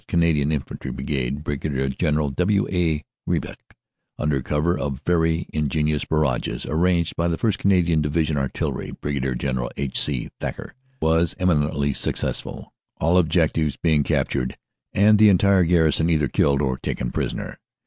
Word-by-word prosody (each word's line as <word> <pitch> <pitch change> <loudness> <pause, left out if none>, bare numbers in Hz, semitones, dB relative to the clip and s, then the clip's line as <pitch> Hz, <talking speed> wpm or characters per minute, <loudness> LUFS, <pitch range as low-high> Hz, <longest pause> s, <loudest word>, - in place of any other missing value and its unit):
Cana 85 -1 +2
dian 75 0 0
Infantry 75 -3 -4
Brigade 70 +1 -3
(Brig. 70 -2 -2
General 75 -3 +1
W. 95 +7 +1
A. 80 -5 0 0.2
Griesbach), - - -2 0.6
under 75 -3 0
cover 75 +6 0
of 70 -6 -3
very 80 -1 +1
ingenious 75 0 0
barrages 75 -6 -1
arranged 85 +1 +1
by 85 - 0
the 85 -1 -1
C. - - -21
R. 115 - +4
A., - - +2
1st. - - -5
Canadian 85 -5 +3
Division 75 -2 0 0.5
(Brig. 65 -3 -2
General 65 -3 -2
H. 70 -2 -1
C. 70 -5 -2
Thacker), - - -5 0.3
was 80 +1 +2
eminently 75 -5 +1
successful, - - -3 0.3
all 85 +4 +3
objectives 80 -2 +1
being 80 -3 +2
captured 65 -2 -1 0.3
and 105 +1 +4
the 105 -1 +7
entire 100 0 +4
garrison 80 -1 +3
either 75 -4 +2
killed 70 +3 +2
or 65 -2 -1
taken - - -3
prisoner. - - -4
75 Hz, 150 wpm, -23 LUFS, 70-85 Hz, 0.6 s, the